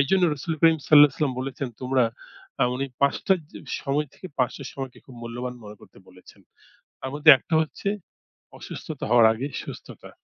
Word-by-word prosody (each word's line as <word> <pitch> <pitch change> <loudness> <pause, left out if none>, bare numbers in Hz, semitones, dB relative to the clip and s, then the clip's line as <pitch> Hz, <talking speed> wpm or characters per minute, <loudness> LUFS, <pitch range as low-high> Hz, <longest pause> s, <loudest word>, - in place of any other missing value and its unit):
এইজন্য 180 +7 +2
রাসূলুল 155 +3 -4
করিম 165 -1 +5
সাল্লাল্লাহু 145 +1 +4
আলাইহি - - -17
ওয়াসাল্লাম 145 -4 -1
বলেছেন, 135 0 -4
তোমরা 130 -1 +2 0.5
অ্যা 135 - +2
উনি 135 +2 -2 0.2
৫ঃ০০ 140 +7 +2 0.2
জ - - -27 0.3
সময় 145 +2 -1
থেকে, - - -10
৫ঃ০০ 125 +2 -1
র - - -6
সময়কে 135 -2 -7
খুব 130 - -13
মূল্যবান 120 +2 -5
মনে 105 0 -10
করতে - - -18
বলেছেন। 90 0 -18 0.6
তার 130 - -6
মধ্যে 150 +2 +4
একটা 145 - -8
হচ্ছে 160 +5 -5 0.7
অসুস্থতা - - -8
হওয়ার 120 -1 +6
আগে 125 +5 -4 0.2
সুস্থতা। - - -10
135 Hz, 175 wpm, -25 LUFS, 125-150 Hz, 0.7 s, হওয়ার